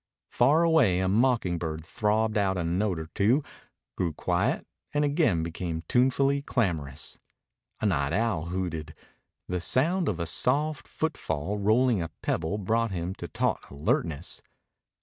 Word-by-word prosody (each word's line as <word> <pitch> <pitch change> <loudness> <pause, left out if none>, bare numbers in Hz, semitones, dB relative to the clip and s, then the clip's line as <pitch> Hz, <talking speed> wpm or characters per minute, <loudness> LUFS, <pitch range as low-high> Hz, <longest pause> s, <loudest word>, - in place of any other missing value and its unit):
Far 145 +7 +4
away 160 - +4
a 95 - +1
mocking 110 -4 +2
bird 80 -1 -4
throbbed 110 +3 0
out 95 -2 +1
a 90 - -1
note 90 +2 0
or 80 - -4
two, 120 +9 +3 0.5
grew 85 -3 -1
quiet, 100 - 0 0.3
and 145 0 +3
again 140 - +2
became 85 0 -4
tunefully 135 +3 +3
clamorous. 80 - -2 0.6
A - - 0
night 70 -8 +1
owl 110 -7 0
hooted. 85 -4 -4 0.5
The 90 -1 -2
sound 165 - +2
of 90 -4 -2
a 85 - -1
soft 145 - +1
footfall 100 - -2
rolling 110 +1 +3
a 80 - -3
pebble 85 +5 -1
brought 115 +3 +1
him 90 -1 -3
to - - -7
taut - - -1
alertness. 75 +3 -1
100 Hz, 145 wpm, -28 LUFS, 85-125 Hz, 0.6 s, Far